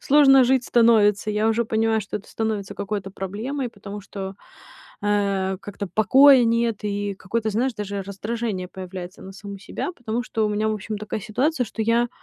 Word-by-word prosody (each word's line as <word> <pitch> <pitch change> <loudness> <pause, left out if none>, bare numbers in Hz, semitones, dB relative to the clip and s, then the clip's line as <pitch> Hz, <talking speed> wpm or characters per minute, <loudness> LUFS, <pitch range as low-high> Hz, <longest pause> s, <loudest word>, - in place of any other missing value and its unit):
сложно 270 -2 +6
жить 255 0 +2
становится. 215 -3 +4
Я 210 +1 +1
уже 230 +1 +1
понимаю, 220 0 +1
что 205 - -5
это 205 - -11
становится 210 -3 -3
какой-то 200 -1 -4
проблемой, 220 +8 -4
потому 205 -2 -9
что, 195 -1 -7 0.7
э, 200 -2 0
как-то 200 0 -6
покоя 265 +4 +7
нет 230 -1 +1
и 205 -1 -2
какое-то, 220 +4 -2
знаешь, 240 +5 0
даже 205 -1 -4
раздражение 200 0 -4
появляется 185 0 -8
на 190 - -9
саму 200 0 -9
себя, 205 - -5
потому 235 -1 -3
что 225 -3 -1
у - - 0
меня, 210 +1 0
в - - 0
общем, 215 +1 -5
такая 215 +1 -4
ситуация, 250 - 0
что 220 - -5
я, 230 +2 +2
215 Hz, 175 wpm, -23 LUFS, 200-230 Hz, 0.7 s, покоя